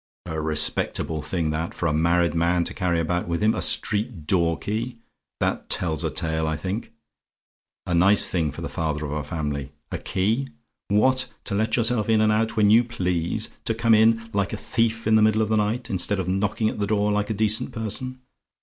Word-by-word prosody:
"A 80 -1 -3
respectable 75 0 +1
thing, 80 -3 -2
that, 80 +2 -3
for - - -3
a 80 - +2
married 85 +2 +2
man 85 +1 +2
to - - -4
carry 85 -3 0
about 90 +2 -1
with 85 +3 -1
him, 110 +1 +4
a - - -3
street 105 -6 0
door 85 -1 +2
key! 115 +6 -4 0.4
That - - -1
tells 80 -3 0
a 80 - 0
tale 80 +2 -2
I 80 -1 -1
think. 95 +9 -4 0.9
A 90 - -2
nice 95 +4 +5
thing 80 -4 0
for - - -9
the - - -2
father 75 -2 -3
of 70 - -5
a 75 0 -2
family! 75 -2 -4 0.2
A - - -3
key! 110 +8 -1 0.4
What, 130 +6 +2 0.2
to 100 - -4
let 110 +2 +1
yourself 115 -2 0
in 110 -1 +4
and 110 0 +3
out 110 +1 0
when 105 -1 +5
you 115 +2 +6
please! 90 -2 -2
To 115 - 0
come 115 0 +3
in, 115 +1 +4
like 100 0 0
a - - -2
thief 115 -1 -1
in 110 0 +4
the - - +4
middle 110 0 +3
of 110 - -3
the 110 - +2
night, 110 +3 -1
instead 100 -1 -1
of 95 - -2
knocking 105 +3 0
at 110 - -3
the 100 - 0
door 105 0 +1
like 105 0 0
a 110 - -1
decent 110 +1 +1
person! 130 +4 -4
100 Hz, 215 wpm, -24 LUFS, 85-110 Hz, 0.9 s, you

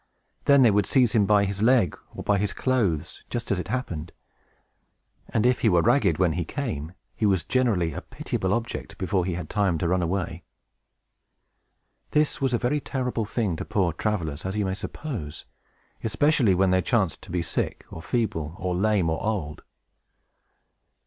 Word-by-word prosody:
Then 140 -2 +6
they 115 - +6
would 105 0 +2
seize 125 -5 +4
him 105 -3 +3
by 105 -1 +4
his 100 0 -3
leg, 115 - +4 0.2
or - - -6
by 100 -1 +2
his 100 0 -1
clothes, 110 - -1
just 120 -2 -3
as 95 - +1
it 90 - -4
happened; 90 -9 -3 1.2
and 110 0 +1
if 125 0 +3
he 110 - +3
were 85 -3 +4
ragged 100 - +3
when 90 -3 +2
he 90 +1 -1
came, 85 - -4 0.2
he 110 - +1
was 95 -4 +2
generally 105 - +1
a - - -5
pitiable 95 - -3
object 115 +2 -3
before 95 -1 0
he 90 - -1
had 85 -2 -5
time 100 -4 +1
to 85 - -1
run 90 +1 +2
away. 85 -1 -2 1.7
This 150 -1 +1
was 135 -2 +2
a 120 - +2
very 125 +5 0
terrible 125 -5 -2
thing 105 -5 -1
to - - -4
poor 90 -5 0
travelers, 85 -5 -2
as 95 +2 -3
you 105 - +1
may 95 - -1
suppose, 105 - -6 0.6
especially 120 -3 +3
when 95 0 +3
they 95 0 +3
chanced 95 -2 0
to - - -13
be 85 -1 0
sick, 85 - -2
or 80 - -7
feeble, 80 - -2
or 90 -1 -2
lame, 100 -1 +2
or 80 0 -1
old. 95 -9 -2
100 Hz, 180 wpm, -25 LUFS, 85-120 Hz, 1.7 s, Then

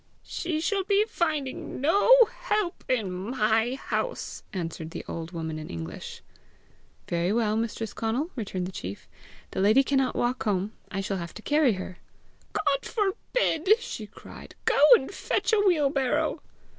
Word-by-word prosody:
"She 330 -3 -3
shall 390 +3 0
be 405 +2 +3
finding 305 -9 -2
no 330 - +3 0.3
help 420 -4 -1
in 220 -7 +1
MY 220 +5 +1
house!" - - -3
answered 165 -3 -4
the - - -7
old 165 0 -5
woman 160 -2 -4
in 155 - -8
English. 80 -1 -7 0.8
"Very 170 +2 0
well, 215 -1 +1
Mistress 225 0 -2
Conal!" 245 +10 -1
returned 195 -6 -3
the 185 - -5
chief; 95 - -7 0.4
"the - - -2
lady 215 +7 +5
cannot 270 -1 +1
walk 245 +1 0
home; 200 0 0 0.2
I 195 - -3
shall 195 0 -2
have 170 -2 -6
to 215 - -9
carry 295 -5 +3
her!" 185 -1 -7 0.5
"God 275 - 0
forbid!" 410 -1 +1
she 220 - -6
cried. - - -12
"Go - - +3
and 270 - -2
fetch 400 - -1
a 435 - +5
wheelbarrow." 290 -9 +2
235 Hz, 150 wpm, -27 LUFS, 190-315 Hz, 0.8 s, lady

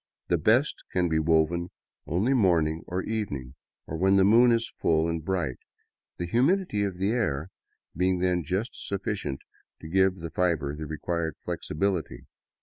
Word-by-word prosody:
The 85 - +3
best 120 - +3
can 90 -1 +1
be 80 0 +2
woven 80 +2 +2 0.4
only 100 - +1
morning 85 -9 +2
or 90 +1 -2
evening, 75 - -4 0.3
or 80 - -5
when 95 +3 +3
the 95 - +5
moon 115 +5 +6
is 115 0 +2
full 80 0 +2
and 85 -1 -2
bright, 85 -8 -2 0.6
the 85 - -3
humidity 125 - +2
of 95 -3 -3
the 95 +3 +1
air 95 - -1 0.5
being 90 +2 +2
then 90 0 +1
just 95 +9 -2
sufficient 95 -8 -4 0.4
to 80 - -9
give 95 +2 +3
the 85 -3 -7
fiber 80 -6 0
the 80 0 -6
required 80 +1 -3
flexibility. 85 -7 -2
90 Hz, 155 wpm, -27 LUFS, 80-100 Hz, 0.6 s, moon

